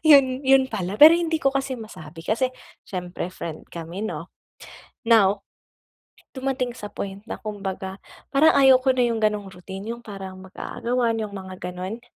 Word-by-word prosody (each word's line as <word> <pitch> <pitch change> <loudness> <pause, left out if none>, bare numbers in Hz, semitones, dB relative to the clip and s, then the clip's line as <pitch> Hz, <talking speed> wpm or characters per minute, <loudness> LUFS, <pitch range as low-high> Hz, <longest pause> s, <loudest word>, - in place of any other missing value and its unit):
yun, 275 -4 +6
yun 265 0 +5
pala 200 -2 -3
pero 310 +3 +11
hindi 330 -2 0
ko 275 - +3
kasi 270 -1 -1
masabi 165 -7 -10
kasi 230 +9 0 0.3
siyempre 180 -1 -5
friend 160 -3 -7
kami 170 +4 -5
'no? 170 -4 -5 0.8
Now, 205 -3 +5 1.0
dumating 260 -2 -2
sa 210 -4 -8
point 195 0 -6
na - - -6
kumbaga 195 -3 -5 0.3
parang 305 +3 +5
ayaw 265 -1 +7
ko 265 - +4
na 255 -1 +2
yung 230 -1 -1
ganong 210 -2 +1
routine. 190 +2 -9
Yung 235 - -15
parang 195 -3 -8
mag-aagawan, 235 +5 -1
yung 210 - -6
mga 190 -1 -7 0.2
ganun. 185 +6 -6
215 Hz, 160 wpm, -24 LUFS, 190-260 Hz, 1.0 s, pero